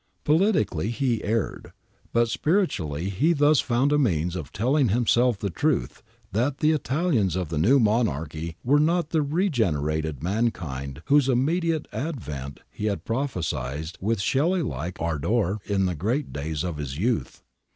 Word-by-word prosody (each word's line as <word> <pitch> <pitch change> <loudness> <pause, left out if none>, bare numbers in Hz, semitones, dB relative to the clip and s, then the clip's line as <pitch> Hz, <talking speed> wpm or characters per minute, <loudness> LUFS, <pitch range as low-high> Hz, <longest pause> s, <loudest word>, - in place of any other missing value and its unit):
Politically 150 - +2
he 120 -2 -1
erred, 110 0 -2 0.4
but 120 0 +3
spiritually 100 - 0
he 150 - +2
thus 145 -1 +4
found 130 +4 +1
a 150 - +3
means 90 - +1
of 80 -7 -6
telling 130 +4 +2
himself 120 +1 +3
the 100 -1 -3
truth 60 -6 -1 0.3
that 125 +7 0
the 155 +1 +3
Italians 140 - +1
of 90 -4 -2
the 80 -2 -2
new 130 - +5
monarchy 85 - 0
were 145 +4 +4
not 165 +1 +1
the 160 - +2
regenerated 80 - 0
mankind 80 - -2
whose 140 -2 +4
immediate 160 +5 +1
advent 75 - -5
he 105 - -5
had 105 -2 -2
prophesied 80 - -2
with 110 +3 0
Shelley 160 - +1
like 90 - -4
ardour 85 +6 0
in 100 -2 +1
the 90 - 0
great 115 - -2
days 75 +2 -3
of 85 -4 -3
his 70 -2 -5
youth. 115 +6 -1
110 Hz, 150 wpm, -25 LUFS, -, 0.4 s, new